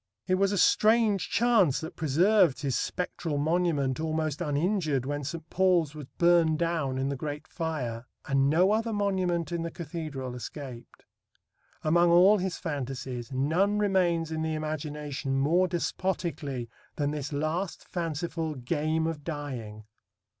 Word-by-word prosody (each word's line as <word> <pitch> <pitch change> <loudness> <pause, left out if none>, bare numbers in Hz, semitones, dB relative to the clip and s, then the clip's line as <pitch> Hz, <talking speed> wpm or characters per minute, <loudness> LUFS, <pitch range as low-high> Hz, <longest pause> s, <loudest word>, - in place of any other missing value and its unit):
It 185 - 0
was 195 +1 +3
a 200 - 0
strange 215 -1 +3
chance 225 - +3
that 160 +1 -7
preserved 165 +1 +3
his 135 -3 0
spectral 170 -4 -2
monument 155 -4 +1
almost 155 -1 -1
uninjured 155 - 0
when 145 +1 -3
St. 160 +3 -5
Paul's 180 -5 +3
was 150 -3 -8
burned 170 -2 +4
down 160 -6 -1
in 135 +1 0
the 140 - -2
Great 145 +2 -5
Fire, 130 -8 -4 0.2
and 135 0 +2
no 180 +6 +4
other 225 +1 0
monument 185 -5 0
in 170 -1 -1
the 170 - -3
cathedral 150 -6 -6
escaped. 125 -1 -9 0.8
Among 170 +2 +4
all 185 +5 +6
his 185 0 -2
fantasies 135 -4 -5
none 165 +10 +1
remains 180 -5 +1
in 160 0 -2
the 160 0 -1
imagination 150 -3 -3
more 170 +7 +3
despotically 170 -7 -2 0.3
than 145 -1 0
this 145 -1 -4
last 155 +5 -2
fanciful 165 -1 -3
game 155 +5 -1
of 160 -3 -3
dying. 125 -9 -6
160 Hz, 140 wpm, -28 LUFS, 145-175 Hz, 0.8 s, all